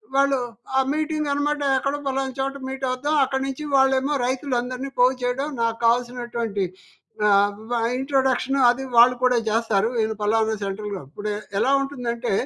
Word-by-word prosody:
వాళ్ళు 275 0 +3 0.4
ఆ - - +6
మీటింగ్ 305 -1 -1
అనమాట 295 +1 -1 0.2
ఎక్కడో 275 +2 -1
పలనా 270 0 -1
చోట 270 +1 -1
మీట్ 265 0 -6
అవుతాం. 290 +5 -1
అక్కడి 265 0 -1
నుంచి 270 +2 -5
వాళ్ళేమో 270 +1 +3
రైతులందరిని 255 0 -2
పోగు 255 +1 +5
చేయడం 260 +4 -1
నాకు 230 0 0
కావాల్సినటువంటి 235 -4 0 0.6
ఆహ్, 205 0 +4 0.2
వ 240 -1 0 0.2
ఇంట్రడక్షను 265 0 +1
అది 250 +2 0
వాళ్ళు 245 +2 +7
కూడా 250 -1 +4
చేస్తారు. 220 -1 +1
ఇది 220 - -1
ఫలానా 220 +1 +2
సెంట్రల్‌ 200 +1 -4
గౌ - - -6
ఇప్పుడు 205 +7 -5 0.3
ఎలా 265 - +2
ఉంటుందంటే 245 -4 -3
255 Hz, 150 wpm, -23 LUFS, 230-270 Hz, 0.6 s, వాళ్ళు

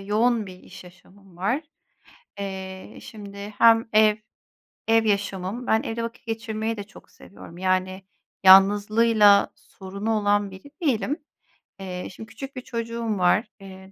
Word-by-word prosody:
yoğun 215 +3 +1
bir 185 -1 -11
iş - - -13
yaşamım 185 +1 -19
var. 205 - 0 0.8
Eee, 190 -1 -7
şimdi 200 -1 -9
hem 225 0 +5
ev 215 0 +5 0.7
ev 225 0 +3
yaşamım, 200 +2 -2
ben 220 - +2
evde 230 +1 -4
vakit 230 +2 -7
geçirmeyi 225 0 -3
de 205 - -5
çok 210 - -17
seviyorum, 175 -3 -14
yani, 185 +1 -1 0.4
yalnızlığıyla 205 +2 +6
sorunu 200 +3 -6
olan 205 -2 +1
biri 190 +10 -13
değilim. 270 -1 0 0.6
Eee, 180 -1 -6
şimdi 220 +3 -11
küçük 270 +5 -9
bir 255 - -5
çocuğum 230 -2 -4
var. 185 +4 +2
Eee, 190 0 -12
205 Hz, 135 wpm, -24 LUFS, 190-225 Hz, 0.8 s, yalnızlığıyla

